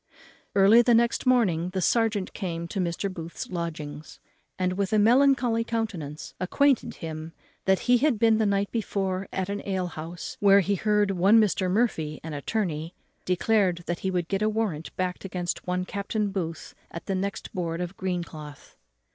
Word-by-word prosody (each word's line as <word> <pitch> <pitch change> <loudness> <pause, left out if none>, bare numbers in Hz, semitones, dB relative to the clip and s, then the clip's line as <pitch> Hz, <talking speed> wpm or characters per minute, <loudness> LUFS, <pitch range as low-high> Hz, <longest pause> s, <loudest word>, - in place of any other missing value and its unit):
Early 200 +4 +7
the 240 -1 +4
next 235 +2 +2
morning 185 -10 +3
the 190 - -1
serjeant 215 -1 +1
came 170 -4 -4
to 195 - -3
Mr. 175 +2 -1
Booth's 165 0 -7
lodgings, 155 -4 -5 0.4
and 185 0 0
with 200 +2 -1
a - - +4
melancholy 245 +1 +4
countenance 200 -11 -4
acquainted 270 +8 +2
him 160 0 -7 0.3
that 190 -1 +3
he 245 -1 +4
had 280 -3 +2
been 225 0 +4
the 215 - +2
night 200 0 0
before 195 -4 -2
at 190 -1 -2
an 200 0 -3
alehouse, 175 -3 -4
where 200 0 +6
he 200 +2 0
heard 210 0 +2
one 195 +4 +5
Mr. 190 -3 +2
Murphy, 180 -8 0
an 160 -1 -6
attorney, 165 +1 -3 0.3
declare 190 +1 +2
that 175 0 -5
he 190 - -2
would 180 -2 -1
get 195 +2 -1
a 215 - +3
warrant 210 -8 -2
backed 185 -1 -2
against 180 -2 -4
one 180 0 -1
Captain 200 +1 -2
Booth 165 -4 -4 0.2
at 170 - -8
the 195 - -2
next 195 +1 -3
board 170 -2 -2
of 180 +1 -4
greencloth. 170 -6 -6
190 Hz, 170 wpm, -26 LUFS, 170-215 Hz, 0.4 s, Early